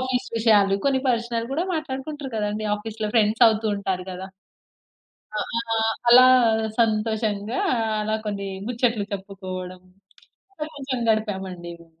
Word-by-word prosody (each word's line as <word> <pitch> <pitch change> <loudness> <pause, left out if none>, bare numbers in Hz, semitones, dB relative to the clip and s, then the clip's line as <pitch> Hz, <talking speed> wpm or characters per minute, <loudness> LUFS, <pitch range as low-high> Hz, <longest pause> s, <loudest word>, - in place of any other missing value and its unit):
Office 255 -1 -1
విషయాలు, 205 -3 +4
కొన్ని 270 -1 +2
personal 235 -1 -1
కూడా 330 +5 0
మాట్లాడుకుంటారు 290 -2 -5
కదండీ. 210 +1 -2
ఆఫీస్‌‌లో 215 0 -5
ఫ్రెండ్స్ 220 +2 +4
అవుతూ 220 0 0
ఉంటారు 190 -2 -2
కదా! 185 +1 -6 1.1
ఆ! - - 0 0.4
ఆహ్, 225 0 +2 0.2
అలా 255 +1 +9 0.5
సంతోషంగా 215 0 0 0.4
అలా 215 +1 0
కొన్ని 200 -1 -3 0.2
ముచ్చట్లు 235 -3 0
చెప్పుకోవడం 185 -2 -6 0.7
అట్ల 305 -5 -5
కొంచెం 265 -3 -4
గడిపాము 210 -3 -1
అండి 175 -1 -8
మేము. 165 -1 -21
220 Hz, 125 wpm, -24 LUFS, 200-245 Hz, 1.1 s, అలా